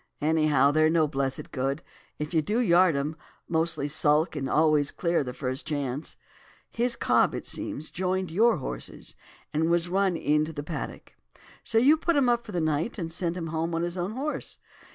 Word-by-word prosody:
Anyhow, 150 Hz, -3 st, +3 dB
they're 155 Hz, +1 st, +4 dB
no 160 Hz, -1 st, +3 dB
blessed 135 Hz, -2 st, -3 dB
good, 135 Hz, +3 st, -2 dB, 0.3 s
if 150 Hz, +3 st, -5 dB
you 160 Hz, -, +3 dB
do 210 Hz, +9 st, -1 dB
yard 180 Hz, -7 st, +4 dB
'em; 145 Hz, +3 st, -2 dB, 0.3 s
mostly 160 Hz, -3 st, 0 dB
sulk 155 Hz, +2 st, +2 dB
and 135 Hz, -3 st, -3 dB
always 150 Hz, -2 st, +3 dB
clear 170 Hz, -3 st, 0 dB
the 125 Hz, -, -5 dB
first 130 Hz, +2 st, -4 dB
chance. 145 Hz, -1 st, -3 dB, 0.5 s
His 235 Hz, +1 st, 0 dB
cob, -, -, +2 dB
it -, -, -5 dB
seems, 155 Hz, +2 st, -1 dB
joined 185 Hz, -1 st, -1 dB
your 225 Hz, +5 st, +4 dB
horses, 130 Hz, -, -5 dB, 0.4 s
and 160 Hz, +2 st, +1 dB
was 170 Hz, 0 st, +1 dB
run 190 Hz, -1 st, +1 dB
in 150 Hz, 0 st, +2 dB
to 160 Hz, -, -7 dB
the 145 Hz, -1 st, -5 dB
paddock. 155 Hz, 0 st, -6 dB, 0.5 s
So 230 Hz, -, -1 dB
you 280 Hz, +7 st, +6 dB
put 340 Hz, +1 st, 0 dB
him 270 Hz, -4 st, +3 dB
up 235 Hz, -1 st, 0 dB
for -, -, -7 dB
the 180 Hz, -, -1 dB
night 155 Hz, +7 st, -1 dB
and 165 Hz, -4 st, -4 dB
sent 170 Hz, 0 st, -2 dB
him 165 Hz, -2 st, -4 dB
home 165 Hz, +1 st, -1 dB
on 165 Hz, -, 0 dB
his 175 Hz, 0 st, -2 dB
own 185 Hz, +3 st, -3 dB
horse. 285 Hz, +5 st, -4 dB
160 Hz, 195 wpm, -27 LUFS, 150-185 Hz, 0.5 s, you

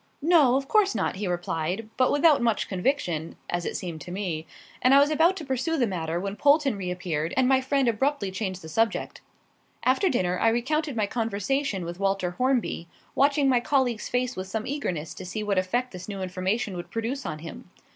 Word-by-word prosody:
"No, 305 Hz, -6 st, +5 dB
of 270 Hz, 0 st, -1 dB
course 410 Hz, +1 st, +3 dB
not," -, -, -1 dB
he 200 Hz, 0 st, -2 dB
replied, 175 Hz, +3 st, -2 dB
but 255 Hz, 0 st, +3 dB
without 290 Hz, -1 st, +4 dB
much 230 Hz, -3 st, +1 dB
conviction, 180 Hz, -, -1 dB, 0.2 s
as 175 Hz, 0 st, -1 dB
it -, -, -2 dB
seemed 170 Hz, -4 st, -6 dB
to 175 Hz, -, -8 dB
me; 175 Hz, -5 st, -3 dB, 0.3 s
and 255 Hz, +2 st, +5 dB
I -, -, +8 dB
was 290 Hz, +2 st, +4 dB
about 335 Hz, +5 st, +3 dB
to 320 Hz, -, -6 dB
pursue 265 Hz, +5 st, -1 dB
the 250 Hz, -, +3 dB
matter 170 Hz, -5 st, -2 dB
when 200 Hz, +2 st, -4 dB
Polton 285 Hz, -3 st, +4 dB
reappeared, 180 Hz, -4 st, -3 dB
and 260 Hz, -1 st, +4 dB
my 265 Hz, 0 st, +4 dB
friend 270 Hz, 0 st, +1 dB
abruptly 235 Hz, -2 st, 0 dB
changed 190 Hz, -2 st, -4 dB
the -, -, -8 dB
subject. 225 Hz, +7 st, -1 dB, 0.6 s
After 265 Hz, +10 st, +3 dB
dinner 180 Hz, -7 st, 0 dB
I -, -, +3 dB
recounted 280 Hz, +5 st, 0 dB
my 215 Hz, -2 st, +1 dB
conversation 225 Hz, 0 st, -1 dB
with 175 Hz, +2 st, -6 dB
Walter 195 Hz, -2 st, 0 dB
Hornby, 250 Hz, -5 st, 0 dB, 0.3 s
watching 280 Hz, 0 st, +3 dB
my 255 Hz, -2 st, +4 dB
colleague's 245 Hz, -3 st, 0 dB
face 250 Hz, 0 st, 0 dB
with 185 Hz, 0 st, -5 dB
some 220 Hz, +3 st, -3 dB
eagerness 180 Hz, -, -3 dB
to -, -, -9 dB
see 210 Hz, +4 st, -4 dB
what 200 Hz, -2 st, +1 dB
effect 245 Hz, +7 st, -1 dB
this 185 Hz, +1 st, -9 dB
new 195 Hz, -2 st, -4 dB
information 185 Hz, +3 st, -2 dB
would 175 Hz, -, -6 dB
produce 235 Hz, +5 st, -3 dB
on 155 Hz, -, -4 dB
him. 165 Hz, +3 st, -10 dB
225 Hz, 200 wpm, -26 LUFS, 185-270 Hz, 0.6 s, I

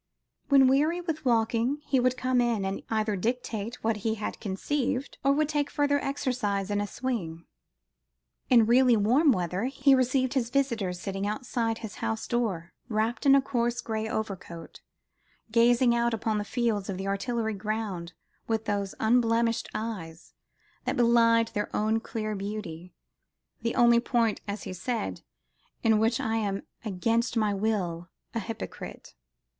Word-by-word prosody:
When 275 Hz, -2 st, +7 dB
weary 295 Hz, +7 st, +3 dB
with 325 Hz, -5 st, -4 dB
walking, 235 Hz, +2 st, +2 dB
he 265 Hz, -, +2 dB
would 255 Hz, 0 st, +2 dB
come 255 Hz, -1 st, +2 dB
in 230 Hz, -5 st, 0 dB
and 195 Hz, +1 st, -3 dB
either 215 Hz, -2 st, 0 dB
dictate 230 Hz, +1 st, -3 dB
what 225 Hz, -1 st, +1 dB
he 220 Hz, +2 st, -1 dB
had 210 Hz, -, -5 dB
conceived, 260 Hz, +6 st, -2 dB
or 275 Hz, -, +4 dB
would 300 Hz, +1 st, +2 dB
take 295 Hz, -1 st, 0 dB
further 285 Hz, -1 st, +1 dB
exercise 235 Hz, -8 st, -1 dB
in 205 Hz, 0 st, +1 dB
a 205 Hz, -, -2 dB
swing. 185 Hz, -11 st, -4 dB, 1.0 s
In 235 Hz, -4 st, +6 dB
really 245 Hz, +1 st, +5 dB
warm 255 Hz, +9 st, +4 dB
weather, 180 Hz, 0 st, -1 dB
he 270 Hz, +1 st, +3 dB
received 260 Hz, 0 st, +2 dB
his 250 Hz, -4 st, 0 dB
visitors 235 Hz, -10 st, 0 dB
sitting 195 Hz, +1 st, -3 dB
outside 225 Hz, 0 st, -1 dB
his 220 Hz, -3 st, -8 dB
house 220 Hz, 0 st, -2 dB
door, 195 Hz, -8 st, -2 dB, 0.2 s
wrapped 225 Hz, +5 st, 0 dB
in 275 Hz, -, +8 dB
a 275 Hz, -, +4 dB
coarse 240 Hz, -2 st, 0 dB
grey 220 Hz, -2 st, -3 dB
overcoat 185 Hz, -7 st, -5 dB, 0.7 s
gazing 235 Hz, +1 st, +4 dB
out 235 Hz, -1 st, +1 dB
upon 220 Hz, -1 st, -1 dB
the -, -, -2 dB
fields 220 Hz, -4 st, -1 dB
of 190 Hz, -, -3 dB
the 190 Hz, -, -4 dB
Artillery 220 Hz, +2 st, -1 dB
ground 205 Hz, -4 st, -4 dB, 0.3 s
with 225 Hz, -1 st, -1 dB
those 200 Hz, -2 st, -2 dB
"unblemished 230 Hz, 0 st, +2 dB
eyes" 185 Hz, -7 st, -6 dB, 0.5 s
that 255 Hz, +2 st, -1 dB
belied 230 Hz, -1 st, +4 dB
their 205 Hz, 0 st, -3 dB
own 215 Hz, +1 st, +1 dB
clear 215 Hz, -1 st, -4 dB
beauty 195 Hz, -4 st, -6 dB, 0.7 s
"the 230 Hz, -, -1 dB
only 235 Hz, -1 st, +6 dB
point," 235 Hz, -2 st, +1 dB
as 200 Hz, 0 st, -4 dB
he -, -, -5 dB
said, 225 Hz, +6 st, -3 dB, 0.6 s
"in 220 Hz, -2 st, +4 dB
which 225 Hz, +1 st, +2 dB
I 225 Hz, 0 st, 0 dB
am 200 Hz, -3 st, -2 dB, 0.2 s
against 230 Hz, +4 st, 0 dB
my 215 Hz, -2 st, +2 dB
will 190 Hz, -5 st, -1 dB, 0.2 s
a 230 Hz, -, -1 dB
hypocrite." 225 Hz, +1 st, -7 dB
225 Hz, 155 wpm, -28 LUFS, 205-245 Hz, 1.0 s, in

